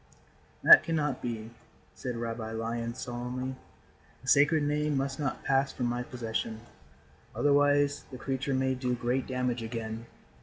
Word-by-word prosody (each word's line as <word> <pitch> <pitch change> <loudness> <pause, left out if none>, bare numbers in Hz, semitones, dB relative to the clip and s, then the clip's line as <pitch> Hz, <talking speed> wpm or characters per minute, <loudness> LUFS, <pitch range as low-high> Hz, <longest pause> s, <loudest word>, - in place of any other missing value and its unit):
"That - - +10
cannot 150 -4 -1
be," 115 -2 -4 0.4
said 125 -1 -5
Rabbi 115 -1 -4
Lion, 115 +1 -3
solemnly. 125 +1 -4 0.7
"The - - -13
Sacred 145 +4 +5
Name 150 0 0
must 135 0 -2
not 135 -4 -2
pass 135 0 +2
from 125 - -3
my 120 0 -1
possession. 115 -2 -4 0.7
Otherwise 145 0 +3
the 130 - -8
creature 135 +1 -2
may 130 0 +1
do 125 -1 -1
great 125 +2 -1
damage 125 -2 -1
again. 115 0 -5
125 Hz, 140 wpm, -30 LUFS, 120-140 Hz, 0.7 s, That